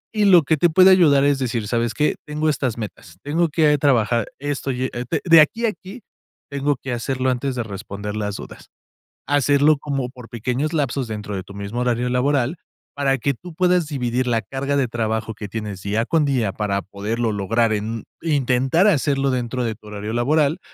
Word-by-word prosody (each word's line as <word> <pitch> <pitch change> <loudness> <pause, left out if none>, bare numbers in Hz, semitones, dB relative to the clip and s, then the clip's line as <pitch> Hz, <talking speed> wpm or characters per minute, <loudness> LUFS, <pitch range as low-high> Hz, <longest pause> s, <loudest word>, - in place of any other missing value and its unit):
Y 210 -1 +3
lo 180 -4 +7
que 155 +2 +1
te 175 +4 +3
puede 185 +4 +6
ayudar 155 -7 +5
es 140 -1 +2
decir: 120 -4 -2
"¿Sabes 120 +1 -1
qué? 150 - +1
Tengo 150 +1 -1
estas 130 -6 0
metas, 100 -6 -8
tengo 165 +4 +1
que 150 -1 +3
trabajar 120 -5 +2
esto, 145 -1 -3
y 125 0 -3
e 120 +1 -4
d 160 - 0
de 165 -2 +8
aquí 225 +10 +1
a - - +3
aquí 195 +4 -10 0.5
tengo 140 +1 0
que 125 0 -5
hacerlo 130 +2 -1
antes 130 +1 -2
de 120 - -2
responder 100 0 -6
las 105 -1 -3
dudas". - - -10 0.6
Hacerlo 145 +1 +3
como 135 -3 -3
por 125 -2 -13
pequeños 125 +6 -2
lapsos 140 -4 -1
dentro 105 -1 -5
de 95 - -4
tu 100 - -13
mismo 100 +4 -4
horario 125 0 0
laboral, 130 +2 +1 0.4
para 135 -1 +1
que 140 +3 0
tú 175 +7 -11
puedas 180 -2 +2
dividir 125 -3 -1
la 115 -2 +1
carga 140 +3 -2
de 135 -2 +1
trabajo 110 -1 -2
que 105 -1 -7
tienes 105 -3 -5
día 105 +4 -1
con 160 +2 +2
día 125 -8 0
para 100 -1 -1
poderlo 110 +4 -3
lograr 110 +3 +1
en 110 +1 -3 0.2
intentar 140 +3 +2
hacerlo 140 -6 +2
dentro 125 0 -2
de 110 -1 -2
tu 105 0 -18
horario 105 +1 -5
laboral. 145 +6 +2
130 Hz, 195 wpm, -21 LUFS, 115-145 Hz, 0.6 s, de